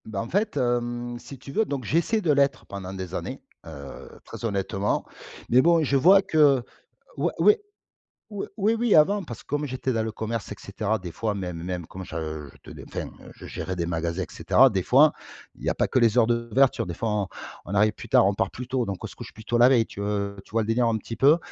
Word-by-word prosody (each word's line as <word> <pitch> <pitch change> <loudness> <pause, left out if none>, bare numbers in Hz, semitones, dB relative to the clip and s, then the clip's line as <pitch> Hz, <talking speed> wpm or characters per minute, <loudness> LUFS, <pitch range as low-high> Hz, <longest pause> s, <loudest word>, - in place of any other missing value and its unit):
Bah 110 -3 -5
en 115 - -4
fait, 205 -3 0
hem, 120 -1 -1
si 135 - -11
tu 135 +2 -11
veux, 220 - +2
donc 140 -10 -4
j'essaie 170 - +1
de 170 -6 +2
l'être 140 -1 +2
pendant 95 -2 -7
des 95 -2 -7
années, - - -4 0.3
heu, 70 -3 -9 0.2
très - - -10
honnêtement. 100 -1 -1 0.4
Mais 125 +2 +6
bon, 170 +1 +4
je 140 -1 +1
vois 185 +8 +6
que 145 -8 +4 0.5
oui - - 0
oui 420 - +6 0.8
oui 205 -2 -4
oui, 215 +2 +2
oui 230 -1 +2
avant, 200 +7 +4
parce 120 -9 -9
que - - -38
comme 145 +1 -2
j'étais 130 0 -2
dans 115 -2 0
le 110 - -2
commerce 110 0 -4
et - - -4
cetera, 105 +2 -2
des 90 -3 -8
fois 110 +3 -2
même 90 -4 -5
même 90 -1 -4
comme 95 +3 -8
je 80 -3 -5 0.2
je - - -10
ten - - -10
enfin - - -5 0.3
je - - -11
gérais 95 - -5
des 85 -1 -2
magasins 85 +1 -2
et - - -4
cetera, 135 +1 +5
des 95 -6 -1
fois 145 - +5 0.4
il - - -16
y - - 0
a - - 0
pas - - +2
que 130 - +1
les 115 0 +3
heures 115 - +5
d'ouverture, 120 +2 +2
des 85 - -5
fois 115 - -3
on 105 -3 -1 0.4
on 95 - -5
arrive 105 +1 +4
plus - - -11
tard, - - +5
on 100 - +2
part 95 -1 -1
plus 125 - -7
tôt, 125 0 -1
donc 100 -4 -6
on - - -1
se - - -11
couche - - -10
plus 110 - -13
tôt 120 +2 0
la 120 +1 +7
veille, 120 -4 +4
tu, - - -9
heu, 100 -1 -2
tu - - -22
vois 115 0 +2
le - - -4
délire 115 +2 +2
un 115 - +1
petit 115 - -7
peu? 145 +7 +5
115 Hz, 250 wpm, -25 LUFS, 100-135 Hz, 0.8 s, la